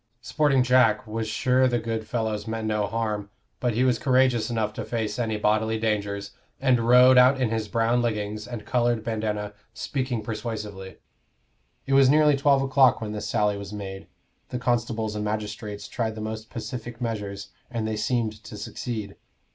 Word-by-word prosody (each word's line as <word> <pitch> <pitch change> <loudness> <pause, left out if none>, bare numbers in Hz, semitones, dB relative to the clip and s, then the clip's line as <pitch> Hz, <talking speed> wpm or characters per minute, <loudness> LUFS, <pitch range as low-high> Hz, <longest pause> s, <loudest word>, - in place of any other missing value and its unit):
"Sporting 135 0 +2
Jack" 125 -1 +4
was 110 0 -3
sure 130 +4 +2
the 120 -1 +1
good 115 -1 -3
fellows 110 -3 -2
meant 110 0 -3
no 105 -1 0
harm, 105 -3 -2 0.3
but 120 -3 0
he 125 - +2
was 125 -3 +2
courageous 130 -4 +2
enough 110 -2 -1
to - - -5
face 115 0 -3
any 110 -3 -1
bodily 110 +1 +1
dangers, 100 -2 -2 0.3
and 125 -4 +2
rode 125 +1 +7
out 130 +2 +5
in 125 -4 +1
his 110 -1 -1
brown 115 +2 +1
leggings 105 -2 -2
and 120 -4 -7
colored 120 -3 +1
bandana, 105 -2 -2 0.2
speaking 130 -5 -2
persuasively. 105 -4 -5 0.9
It 135 - -1
was 135 -1 +6
nearly 150 0 +5
twelve 140 0 +3
o'clock 135 -1 +4
when 110 -1 -4
this 105 -1 -4
sally 105 -1 +1
was 100 +1 -8
made: 95 -2 -7 0.4
the 125 - -3
constables 115 -3 -1
and 105 - -2
magistrates 105 -1 -4
tried 110 -3 -2
the - - -7
most 110 0 -5
pacific 120 0 -6
measures, 100 -4 -4 0.2
and 115 -3 -2
they 110 - -2
seemed 110 -1 -1
to 105 - -8
succeed. 105 -1 -5
110 Hz, 170 wpm, -25 LUFS, 105-125 Hz, 0.9 s, rode